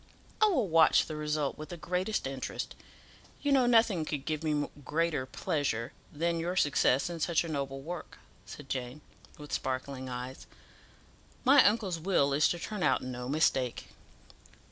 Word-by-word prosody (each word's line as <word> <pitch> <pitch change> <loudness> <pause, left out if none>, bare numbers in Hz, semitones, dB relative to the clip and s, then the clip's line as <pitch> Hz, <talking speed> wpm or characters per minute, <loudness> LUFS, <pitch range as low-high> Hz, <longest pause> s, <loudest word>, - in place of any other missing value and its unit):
I 430 - +7
will 345 - +1
watch 165 -1 +5
the 155 - -6
result 150 -1 -2
with 155 - -7
the 175 - -6
greatest 180 +5 -2
interest. 135 -1 -4 0.7
You 290 - +1
know 260 -3 +4
nothing 225 -8 +4
could 150 -3 -4
give 155 0 -2
me 150 -2 0 0.2
greater 155 -2 0
pleasure 130 -4 -2 0.2
than 170 +2 -1
your 175 +2 -2
success 145 -5 +3
in 170 -1 -5
such 165 +1 +1
a - - -5
noble 140 -3 -3
work," 170 +3 -7 0.3
said 145 - -10
Jane, 130 +2 -4 0.4
with 150 -1 -9
sparkling 130 0 -3
eyes. 125 +1 -6 1.0
"My 275 +1 +8
uncle's 200 -5 +2
will 160 -5 +2
is 145 +2 +4
to 175 - -1
turn 210 +3 -5
out - - +2
no 125 -1 -5
mistake." 135 -4 +1
155 Hz, 160 wpm, -30 LUFS, 135-175 Hz, 1.0 s, My